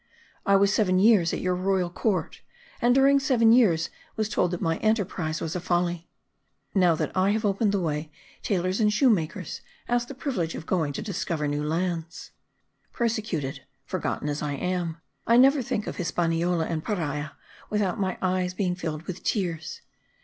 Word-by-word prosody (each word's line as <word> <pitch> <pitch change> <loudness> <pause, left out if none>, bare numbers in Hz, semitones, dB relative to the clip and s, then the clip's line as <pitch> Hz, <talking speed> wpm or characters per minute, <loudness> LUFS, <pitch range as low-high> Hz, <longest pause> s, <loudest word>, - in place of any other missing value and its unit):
I 200 - +5
was 200 +1 +4
seven 185 -4 +2
years 195 -4 +5
at - - -3
your 185 0 +1
royal 185 -1 0
court, 200 +1 -1 0.4
and 245 +1 +4
during 275 +1 +5
seven 245 -5 +4
years 190 -10 +4 0.2
was 215 -1 -1
told 180 - +1
that 175 0 -3
my 165 -3 0
enterprise 190 -7 0
was 165 +1 -4
a - - -1
folly. 175 -1 -1 0.6
Now 180 -4 +4
that - - -3
I 190 +1 +3
have 220 0 -1
opened 200 +1 +2
the 200 - +1
way, 155 -2 -2 0.3
tailors 185 0 0
and 210 -1 +4
shoemakers 200 - +1 0.3
ask 240 0 +1
the 275 - -8
privilege 230 - -2
of 160 - -7
going 165 -6 0
to - - -4
discover 175 -6 -2
new 145 +1 -1
lands. 165 +1 -3 0.6
Persecuted, 215 - -2 0.2
forgotten - - -3
as 145 0 -2
I 150 -1 -2
am, 175 +1 -2 0.3
I 235 - +5
never 270 +2 +6
think 215 -3 -2
of - - -5
Hispaniola 170 -1 0
and 160 -1 -3
Paria 150 -7 -3 0.4
without 205 -3 0
my 190 -1 -1
eyes 185 -1 0
being 180 -2 0
filled 160 -3 -4
with 185 +1 -6
tears. 170 -7 -2
180 Hz, 170 wpm, -26 LUFS, 165-210 Hz, 0.6 s, never